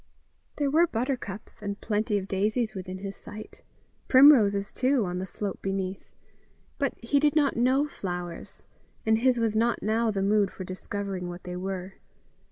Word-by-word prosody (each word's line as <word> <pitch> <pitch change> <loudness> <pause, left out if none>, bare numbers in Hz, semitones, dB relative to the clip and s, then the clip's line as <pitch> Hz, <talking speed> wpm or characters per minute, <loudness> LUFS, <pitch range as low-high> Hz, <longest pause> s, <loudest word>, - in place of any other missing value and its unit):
There 285 -2 0
were 335 +4 +5
buttercups 235 - -4
and 200 0 -4
plenty 215 0 0
of 195 -1 -4
daisies 215 +4 0
within 185 -1 -6
his 195 +1 -6
sight 215 +1 -10 0.5
primroses, 225 -8 +6
too, 255 -3 +2
on 180 0 -3
the 190 - -4
slope 200 +1 -4
beneath; 195 0 -3 0.7
but 275 -3 0
he 280 +5 +2
did 295 0 +2
not 290 -3 +3
know 260 +5 +3
flowers, 175 - -6 0.4
and 220 0 +3
his 255 +1 +3
was 225 -2 0
not 230 +2 +1
now 225 +2 +1
the 195 -2 -1
mood 205 0 +3
for 185 - -8
discovering 185 0 -4
what 175 +1 -8
they 180 0 -6
were. 190 0 -5
210 Hz, 165 wpm, -27 LUFS, 190-245 Hz, 0.7 s, primroses